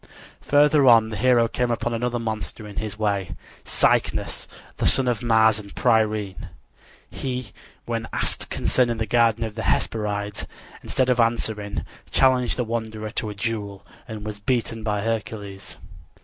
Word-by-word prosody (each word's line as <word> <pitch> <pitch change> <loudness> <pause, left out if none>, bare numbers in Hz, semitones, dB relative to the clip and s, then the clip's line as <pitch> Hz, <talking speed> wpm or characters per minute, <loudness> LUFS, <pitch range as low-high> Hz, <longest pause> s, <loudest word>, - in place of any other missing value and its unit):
Farther 145 -1 +4
on 115 -2 +7
the 110 - -5
hero 120 +1 +4
came 125 +1 -1
upon 115 0 -1
another 120 +1 -1
monster 110 -1 -4
in 105 - -11
his 110 0 -4
way 100 -4 -1 0.3
Cycnus, - - 0 0.3
the - - +1
son 130 -1 +2
of 120 -2 0
Mars 110 -2 +4
and 100 -1 -11
Pyrene. 110 -5 +1 0.6
He, 125 -3 -5 0.3
when - - -3
asked - - 0
concerning 120 -3 +1
the 110 - -1
garden 115 0 +3
of 110 -1 -4
the 110 - -5
Hesperides, 105 -2 -1 0.3
instead 130 -1 +1
of 125 - +1
answering, 110 -3 0 0.2
challenged 130 -2 +3
the 125 - +1
wanderer 110 -1 -4
to 110 - -3
a 105 - -6
duel, 100 -2 -4 0.2
and 110 -2 -7
was 105 -1 -5
beaten 115 0 -1
by 105 -2 -1
Hercules. 105 -3 -4
110 Hz, 150 wpm, -24 LUFS, 105-120 Hz, 0.6 s, on